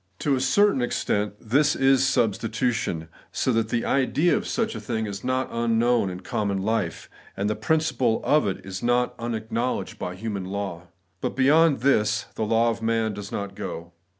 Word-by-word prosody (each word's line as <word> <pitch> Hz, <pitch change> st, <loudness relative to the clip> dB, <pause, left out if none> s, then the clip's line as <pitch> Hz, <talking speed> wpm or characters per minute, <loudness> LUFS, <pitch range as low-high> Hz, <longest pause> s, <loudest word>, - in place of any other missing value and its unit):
To 140 Hz, +5 st, +1 dB
a 130 Hz, -, -1 dB
certain 135 Hz, +2 st, +3 dB
extent, 105 Hz, -4 st, -1 dB
this 145 Hz, +6 st, +2 dB
is 135 Hz, 0 st, +4 dB
substitution; 115 Hz, -7 st, 0 dB, 0.2 s
so 130 Hz, -, 0 dB
that 115 Hz, -1 st, +1 dB
the 115 Hz, 0 st, -1 dB
idea 145 Hz, -, +2 dB
of 215 Hz, -1 st, -2 dB
such 225 Hz, -1 st, -1 dB
a -, -, -5 dB
thing 110 Hz, -3 st, -2 dB
is 100 Hz, -1 st, -6 dB
not 130 Hz, 0 st, 0 dB
unknown 115 Hz, -2 st, +2 dB
in 90 Hz, 0 st, -7 dB
common 100 Hz, -2 st, -2 dB
life, 105 Hz, -6 st, -1 dB, 0.3 s
and 100 Hz, -, 0 dB
the 105 Hz, -, 0 dB
principle 130 Hz, -2 st, +1 dB
of 150 Hz, -7 st, +3 dB
it 95 Hz, 0 st, -5 dB
not 120 Hz, +1 st, +1 dB
unacknowledged 115 Hz, +1 st, -3 dB
by 90 Hz, 0 st, -4 dB
human 100 Hz, -1 st, -4 dB
law. 95 Hz, -3 st, -5 dB, 0.3 s
But -, -, -2 dB
beyond 145 Hz, 0 st, +4 dB
this 110 Hz, -5 st, +2 dB
the 110 Hz, -, -2 dB
law 115 Hz, +2 st, +3 dB
of 115 Hz, 0 st, -6 dB
man 115 Hz, -1 st, 0 dB
does 100 Hz, 0 st, -7 dB
not 100 Hz, -1 st, -4 dB
go. 85 Hz, -3 st, -6 dB
115 Hz, 175 wpm, -25 LUFS, 100-130 Hz, 0.3 s, is